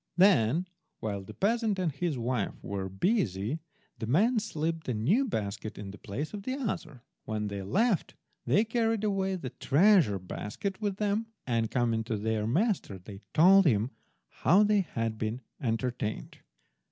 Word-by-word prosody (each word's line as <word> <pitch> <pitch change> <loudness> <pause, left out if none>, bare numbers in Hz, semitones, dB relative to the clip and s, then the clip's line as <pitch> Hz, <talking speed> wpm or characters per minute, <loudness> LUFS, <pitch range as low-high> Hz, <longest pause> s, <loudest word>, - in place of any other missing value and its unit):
Then 175 - +4 0.3
while 100 -2 -3
the - - -11
peasant 220 0 +1
and 180 -4 0
his 145 +1 -2
wife 120 -3 -1
were 95 -1 -3
busy, 110 - 0 0.4
the 110 - -3
men 220 - +3
slipped 165 -5 -3
the 125 - -1
new 180 - +2
basket 105 - -4
in 100 -1 -6
the 100 - -12
place 140 - -5
of 205 - -5
the 255 +6 -3
other. 170 - -4 0.2
When 105 -1 -2
they 100 -1 -4
left 200 - +1 0.3
they 210 +4 +3
carried 225 -1 0
away 195 -2 0
the 135 -9 -5
treasure 160 - +4
basket 105 - -5
with 200 -2 -1
them, 210 +2 0 0.2
and 115 -3 0
coming 115 -2 +1
to 110 -1 -2
their 110 0 -1
master 175 - 0
they 95 +2 -11
told 190 +3 +7
him 115 -1 +2 0.4
how 195 +5 +4
they 210 -1 +4
had 115 - -3
been 110 +3 -2 0.2
entertained. 115 - -2
140 Hz, 160 wpm, -29 LUFS, -, 0.4 s, told